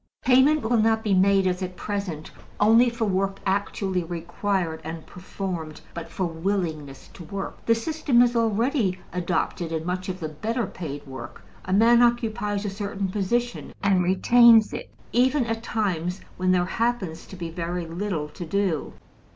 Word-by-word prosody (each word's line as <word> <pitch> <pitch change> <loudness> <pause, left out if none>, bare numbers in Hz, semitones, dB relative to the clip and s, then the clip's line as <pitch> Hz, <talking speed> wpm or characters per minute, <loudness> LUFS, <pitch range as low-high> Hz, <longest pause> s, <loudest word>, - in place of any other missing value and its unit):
Payment 270 +4 +5
will 235 +2 +2
not 220 0 +2
be 210 - +1
made, 195 +1 +4
as 180 0 0
at 185 -1 -4
present, 195 -7 -4 0.3
only 225 +4 +6
for 235 -1 -2
work 195 0 0
actually 195 -1 -1
required 175 0 -2
and 160 +1 -6
performed, 180 -4 -6
but 170 -1 -7
for 180 +3 -2
willingness 165 -5 -3
to 180 - -10
work. 195 +4 -6
This 230 0 +2
system 305 -6 +3
is 240 0 +1
already 225 -2 +1 0.2
adopted 175 -1 -1
in 160 0 -3
much 185 +1 -3
of 185 0 -4
the 160 -3 -4
better 225 - -2
paid 150 -7 -7
work: 130 -3 -9 0.2
a 185 - -4
man 230 +4 +5
occupies 220 -4 +1
a - - 0
certain 200 -1 -3
position, 235 +5 -2
and 195 -2 +3
retains 225 +4 +6
it - - -6 0.2
even 255 +2 +3
at 225 0 -2
times 185 -6 -2 0.2
when 185 0 +1
there 180 -1 +3
happens 195 -6 -2
to - - -10
be 170 -2 -6
very 170 +1 -3
little 165 -2 -3
to 160 - -8
do. 180 -2 -1
195 Hz, 165 wpm, -25 LUFS, 175-225 Hz, 0.3 s, only